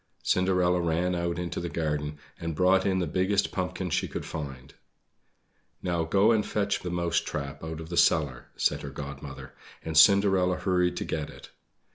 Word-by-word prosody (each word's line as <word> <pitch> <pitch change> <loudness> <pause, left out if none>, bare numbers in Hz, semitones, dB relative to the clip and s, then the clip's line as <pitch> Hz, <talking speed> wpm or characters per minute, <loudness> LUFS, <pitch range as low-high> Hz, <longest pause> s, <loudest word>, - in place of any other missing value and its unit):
Cinderella 90 -1 +2
ran 85 +2 0
out 85 -1 -1
into 90 -1 -3
the 85 - -4
garden 75 -2 -2 0.2
and 85 -1 -4
brought 95 +3 +3
in 95 -1 +1
the 90 - 0
biggest 95 +5 +1
pumpkin 90 0 -3
that - - -3
she - - +1
could - - -5
find. 70 -3 -7 1.1
"Now 85 -2 0
go 100 +6 +4
and 110 -2 +3
fetch 100 -1 -1
the 90 - -5
mouse 85 -1 +1
trap 70 -1 -5
out 80 0 -5
of 80 0 -8
the 85 - -4
cellar," 70 -6 +2
said - - +1
her - - -6
Godmother, 70 -1 -8 0.3
and 80 - -4
Cinderella 95 +1 +5
hurried 90 0 +1
to - - -3
get - - -3
it. - - -13
85 Hz, 180 wpm, -28 LUFS, 80-90 Hz, 1.1 s, Cinderella